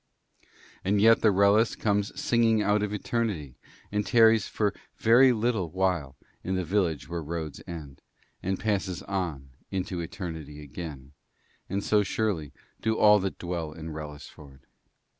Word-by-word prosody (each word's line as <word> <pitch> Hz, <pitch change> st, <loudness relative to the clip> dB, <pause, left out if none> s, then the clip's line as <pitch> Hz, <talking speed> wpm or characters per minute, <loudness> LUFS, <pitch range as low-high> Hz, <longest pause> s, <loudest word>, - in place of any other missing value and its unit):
And 100 Hz, +2 st, +2 dB
yet 115 Hz, +2 st, +6 dB
the 110 Hz, -, +5 dB
Wrellis 100 Hz, +3 st, +4 dB
comes 105 Hz, +5 st, 0 dB
singing 115 Hz, -6 st, +3 dB
out 105 Hz, 0 st, +2 dB
of 105 Hz, -1 st, -1 dB
eternity, 105 Hz, -, -2 dB, 0.4 s
and 105 Hz, 0 st, 0 dB
tarries 115 Hz, -2 st, +5 dB
for 105 Hz, -2 st, 0 dB
a -, -, -12 dB, 0.2 s
very 125 Hz, +4 st, +6 dB
little 110 Hz, -6 st, 0 dB
while 90 Hz, -7 st, -1 dB, 0.3 s
in 95 Hz, -, -1 dB
the 95 Hz, -, 0 dB
village 85 Hz, -4 st, 0 dB
where 85 Hz, 0 st, -4 dB
roads 80 Hz, -1 st, -5 dB
end, 75 Hz, -5 st, -8 dB, 0.4 s
and 95 Hz, +1 st, -2 dB
passes 95 Hz, -4 st, -1 dB
on 85 Hz, -9 st, -4 dB, 0.2 s
into 95 Hz, -1 st, -3 dB
eternity 80 Hz, -4 st, -6 dB
again; 70 Hz, -2 st, -8 dB, 0.6 s
and 100 Hz, +2 st, -2 dB
so 105 Hz, -1 st, +3 dB
surely 95 Hz, -7 st, -1 dB, 0.3 s
do 110 Hz, 0 st, 0 dB
all 105 Hz, 0 st, +6 dB
that 95 Hz, 0 st, -3 dB
dwell 85 Hz, -3 st, -4 dB
in 80 Hz, 0 st, -7 dB
Wrellisford. 75 Hz, -2 st, -10 dB
95 Hz, 145 wpm, -27 LUFS, 80-105 Hz, 0.6 s, yet